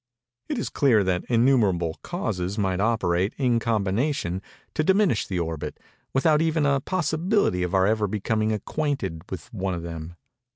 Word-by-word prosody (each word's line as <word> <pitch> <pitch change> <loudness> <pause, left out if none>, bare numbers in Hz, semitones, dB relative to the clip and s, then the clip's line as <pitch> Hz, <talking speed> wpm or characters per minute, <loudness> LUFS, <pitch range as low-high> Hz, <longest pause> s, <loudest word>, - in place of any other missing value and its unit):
It 295 - -1
is 230 - -2
clear 120 -8 +3
that 90 -2 0
innumerable 115 -9 +2
causes 90 +3 -3
might 95 -3 0
operate, 100 -3 +1
in 125 -4 +2
combination, 110 - 0 0.3
to 155 - +1
diminish 190 - +3
the 95 - -2
orbit, 80 -3 -3 0.3
without 150 +3 +3
even 160 -2 +1
a 140 -1 +3
possibility 170 - +1
of 90 +1 -1
our 95 0 +4
ever 105 0 +2
becoming 110 +2 0
acquainted 105 - -2
with 95 +6 -7
one 95 -3 -2
of 85 - -6
them. 85 0 -7
110 Hz, 155 wpm, -25 LUFS, 90-140 Hz, 0.3 s, our